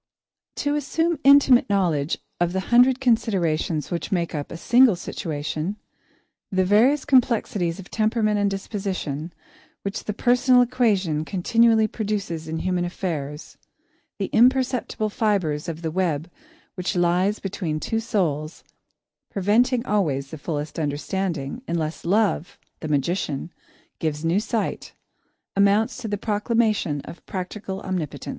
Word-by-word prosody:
To 290 0 -1
assume 325 +2 0
intimate 275 -4 +6
knowledge 170 -7 +1 0.2
of 175 0 +1
the 190 - 0
hundred 250 +2 +6
considerations 185 - 0
which 170 - -3
make 170 -3 0
up 145 -2 -4
a 170 - -6
single 240 +3 +5
situation, 160 +2 -4 0.8
the 185 -1 +2
various 245 +9 +4
complexities 225 -10 +2
of 195 -2 -11
temperament 215 -1 +1
and 200 0 +2
disposition 190 -6 -4 0.5
which 200 +1 -4
the 210 - -2
personal 250 +2 +4
equation 205 -11 +1
continually 220 +5 +3
produces 200 -8 -3
in 160 0 -3
human 180 -1 0
affairs, 155 -5 -5
of - - -39 0.5
the 200 - -1
imperceptible 250 -3 +2
fibres 185 -10 0
of 165 +1 -6
the 160 - -2
web 170 -2 -1 0.4
which 180 0 -3
lies 180 +4 +2
between 175 -5 -3
two 225 +7 -1
souls, 165 -8 -2 0.7
preventing 235 +6 +2
always 145 - 0
the 160 - -7
fullest 150 0 -4
understanding, 155 - -2
unless 160 -1 -3
Love, 200 -2 +1 0.2
the 155 - -5
magician, 150 +2 -1 0.5
gives 155 -1 -2
new 170 +4 +2
sight 225 0 -3 0.6
amounts 200 +2 +3
to 250 -3 -5
the 205 -1 -2
proclamation 210 - 0
of 170 - -11
practical 190 +1 -5
Omnipotence. 180 -6 -4
195 Hz, 130 wpm, -23 LUFS, 165-225 Hz, 0.8 s, intimate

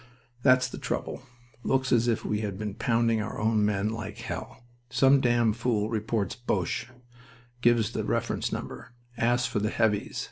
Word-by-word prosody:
"That's 125 -1 +5
the - - -8
trouble. - - -3 0.4
Looks 130 0 0
as 120 -1 +4
if 115 -2 0
we 105 - 0
had 100 -3 -3
been 105 -1 -4
pounding 115 -1 +1
our - - -5
own 110 0 +2
men 105 0 +1
like 105 -1 -5
hell. 115 +2 -7 0.3
Some 135 +3 +5
damn 120 -3 +3
fool 115 -2 0
reports 110 -3 -1
'Boches.' 105 -7 -2 0.7
Gives 120 -3 +3
the - - -2
reference - - -1
number. 115 - -6 0.2
Asks 120 +1 +2
for - - -1
the 105 +1 0
'Heavies'. 105 -2 0
115 Hz, 165 wpm, -28 LUFS, 105-120 Hz, 0.7 s, That's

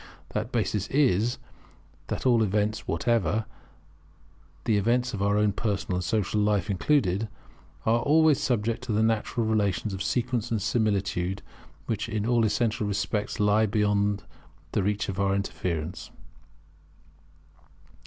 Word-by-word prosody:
That 110 +3 -3
basis 105 -3 -1
is, 120 -5 +2 0.7
that - - -4
all 120 -3 +4
events 105 +1 0
whatever, 110 +2 +1 1.2
the 110 - +2
events 120 +5 +1
of 100 - -3
our 100 +1 +2
own 105 -1 +3
personal 100 -3 -2
and 90 - -2
social 105 +2 0
life 105 -1 +1
included, 105 -1 +1 0.6
are 115 +1 +3
always 150 +1 +4
subject 115 -5 0
to 115 - -2
natural 110 +2 +1
relations 105 -2 0
of 95 - -5
sequence 120 +1 -1
and 115 - 0
similitude, 100 -4 0 0.4
which 115 0 -2
in 110 -2 -2
all 120 -1 +3
essential 110 -1 0
respects 105 +1 -2
lie 105 +1 +3
beyond 105 -1 +1 0.5
the 105 - +1
reach 105 +2 -1
of 95 -1 -4
our 100 0 +2
interference. 90 -4 -3
105 Hz, 130 wpm, -27 LUFS, 100-115 Hz, 1.2 s, all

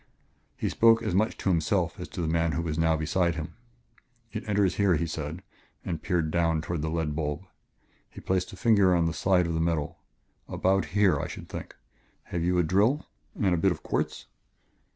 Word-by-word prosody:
He - - -2
spoke 115 0 +4
as 110 - -1
much 105 +4 +1
to - - -1
himself 80 -4 0
as - - -6
to - - -6
the - - -1
man 80 0 +1
who 85 - -1
was 80 -1 -3
now 80 -1 +3
beside 85 +2 0
him. 80 -1 -5 0.8
"It - - -5
enters 100 -3 +2
here," 100 -3 +3
he 85 - 0
said 80 +2 -5 0.4
and 80 - -3
peered 85 -4 0
downward 80 -2 +1
toward 85 -1 -3
the 80 - -2
lead 80 -2 -2
bulb. 75 +3 -3 0.6
He - - -11
placed 90 -1 -1
a 95 - -11
finger 100 -6 +4
on 85 -1 +2
the 80 - 0
side 90 0 +2
of 85 - -2
the 80 - -1
metal. 80 -3 -1 0.5
"About 95 -1 +1
here, 95 -8 +4
I - - -3
should - - -9
think.... - - -7 0.5
Have 85 -1 -3
you 90 +1 +1
a 90 - +4
drill? 105 - +2 0.3
And 95 -3 +2
a - - +2
bit 95 +2 +3
of 80 - -5
quartz?" - - -2
85 Hz, 205 wpm, -27 LUFS, 80-95 Hz, 0.8 s, spoke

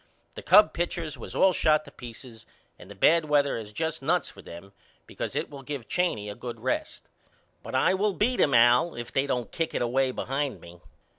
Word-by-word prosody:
The - - -8
Cub 210 - +6
pitchers 170 -3 -3
was - - -9
all 190 -1 +4
shot 155 -2 +2
to - - -13
peaces 120 -1 -11 0.3
and 90 - -14
the 100 - -10
bad 160 - +4
weather 145 -2 +2
is 110 -2 -7
just 160 +6 -3
nuts 165 +5 0
for 100 - -14
them 95 +3 -12 0.3
because - - -6
it - - -1
will 140 -1 -9
give 135 -3 -6
Cheney 155 - -1
a 105 - -5
good 120 +1 -8
rest. 130 - -3 0.6
But - - -7
I 165 +8 +3
will 200 +2 +1
beat 245 +6 0
him 140 - +3
Al 120 +7 +5
if 120 -1 -7
they 135 +1 +1
don't 125 -4 -2
kick 165 -1 -3
it - - -1
away 130 +2 +1
behind 135 +2 -3
me. 85 0 -14
135 Hz, 210 wpm, -27 LUFS, 115-160 Hz, 0.6 s, Cub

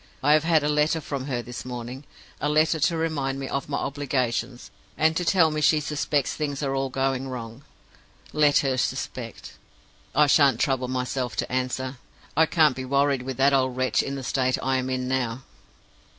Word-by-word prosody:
I 145 +2 +5
have 155 0 +3
had 160 -3 +3
a - - +1
letter 150 +2 +2
from 140 -3 -5
her 120 -3 -2
this 120 0 -7
morning 125 +2 -7 0.3
a 145 - 0
letter 155 +2 +2
to 165 +2 +2
remind 140 -5 -1
me 135 - -4
of 140 +1 -3
my 140 - -1
obligations, 130 -3 -2 0.3
and 160 0 +3
to 180 - 0
tell 170 -3 +4
me 155 0 -2
she 155 +1 +4
suspects 145 -1 -1
things 145 -2 -3
are 135 -1 -1
all 135 0 -1
going 135 0 -1
wrong. 120 0 -7 0.7
Let 150 -1 +4
her 130 -1 +1
suspect! - - -4 0.6
I 150 +2 +6
shan't 140 -4 +4
trouble 130 -2 +1
myself 125 0 -2
to - - -2
answer; 130 +1 -2 0.4
I 160 +2 +4
can't 155 -5 +3
be 130 - -5
worried 140 0 +1
with 130 0 -5
that 140 +1 +4
old 130 -2 +1
wretch 130 0 +2
in 140 - -4
the 135 - -6
state 130 0 0
I 130 0 +1
am 130 0 -2
in 130 -1 -2
now. 130 -1 -1
135 Hz, 195 wpm, -25 LUFS, 130-150 Hz, 0.7 s, I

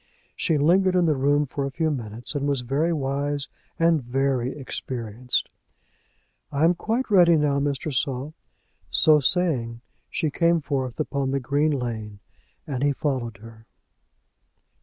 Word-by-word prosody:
She 160 - +1
lingered 185 +5 +3
in 180 -1 +4
the 155 -2 +2
room 145 +2 +2
for 140 +1 -4
a 135 - -1
few 155 +3 -1
minutes, 115 -3 -4
and 145 -1 -1
was 140 -3 0
very 140 +7 0
wise 145 -1 -2 0.3
and 165 -3 +3
very 130 0 0
experienced. 125 -3 -3 1.0
"I 145 +1 0
am 170 +2 +5
quite 225 +7 -2
ready 175 -4 +6
now, 145 -2 +2
Mr. 145 +1 -2
Saul." 135 +2 -2 0.6
So 155 -1 +5
saying, 130 -7 0 0.3
she 155 - -1
came 170 +2 +2
forth 135 -4 -3
upon 140 -3 -1
the 135 +1 0
green 140 +4 +1
lane, 115 -7 -3 0.5
and 135 -4 -4
he 145 0 +2
followed 130 -6 -2
her. 115 -1 -14
140 Hz, 145 wpm, -24 LUFS, 130-155 Hz, 1.0 s, ready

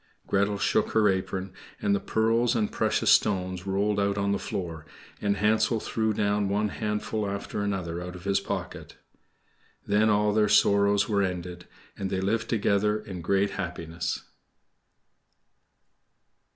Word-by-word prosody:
Gretel 100 +1 +1
shook - - +1
her 110 -1 +4
apron, 95 0 -2 0.3
and 100 - +1
the 100 - +2
pearls 115 +4 +1
and 110 -3 0
precious - - +1
stones 95 -2 +2
rolled 100 +2 +1
out 100 0 +1
on 100 0 0
the 100 - 0
floor, 85 -4 -5 0.4
and 100 -1 +1
Hansel 110 +3 +2
threw 110 0 -1
down 105 -1 0
one 105 +1 +1
handful 105 0 -2
after 100 +1 -4
another 90 -4 -2
out 90 0 -7
of 90 - -10
his 100 0 +1
pocket. - - -6 0.9
Then 105 +2 +3
all 105 0 +2
their 105 -1 +3
sorrows 100 -1 +4
were 105 -3 +1
ended, 90 -2 -4 0.3
and 95 -1 -4
they 95 - -1
lived 110 +4 -1
together 105 -1 +2
in 95 -4 -7
great 100 +4 +1
happiness. 85 -3 -4
100 Hz, 145 wpm, -27 LUFS, 95-105 Hz, 0.9 s, her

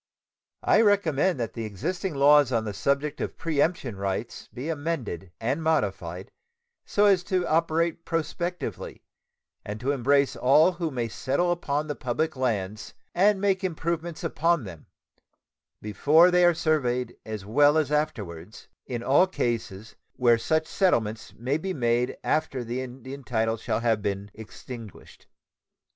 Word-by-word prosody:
I - - +4
recommend 190 - +2
that 115 -2 -3
the 115 - -5
existing 160 - -3
laws 145 -1 +5
on 115 -2 0
the 105 - -4
subject 140 +8 -1
of - - -4
preemption 150 - 0
rights 100 +3 -4
be 130 +5 -6
amended 145 - -3
and 130 +8 -1
modified 95 - -1 0.6
so 205 - +3
as 195 -3 +5
to 185 -3 0
operate 165 +1 +1
prospectively 170 +2 -4 0.6
and 105 +1 -6
to 130 +5 0
embrace 140 +1 +2
all 150 +7 +5
who 170 -2 -3
may 120 -5 -2
settle 140 +10 0
upon 150 -4 -1
the 150 - -3
public 150 +4 -2
lands 110 -5 -2 0.2
and 195 +2 +3
make 195 -1 +1
improvements 170 -1 -3
upon 165 -2 +1
them, 85 -7 -10 1.0
before 150 - +4
they 180 0 +5
are 175 -1 +4
surveyed 125 -7 0
as 110 -3 -6
well 145 +8 +4
as 155 -2 +1
afterwards, 110 - -3 0.2
in 120 -2 -4
all 145 +9 +4
cases 115 - -3 0.2
where 120 -2 +3
such 160 +5 +1
settlements 110 - 0
may 130 +6 -1
be 190 +2 -3
made 120 -1 0
after 150 -5 0
the 120 +2 -3
Indian 130 +2 -8
title 115 -2 0
shall 115 - -2
have 115 -3 +1
been 100 0 -3
extinguished. 110 0 -11
140 Hz, 145 wpm, -26 LUFS, 115-165 Hz, 1.0 s, laws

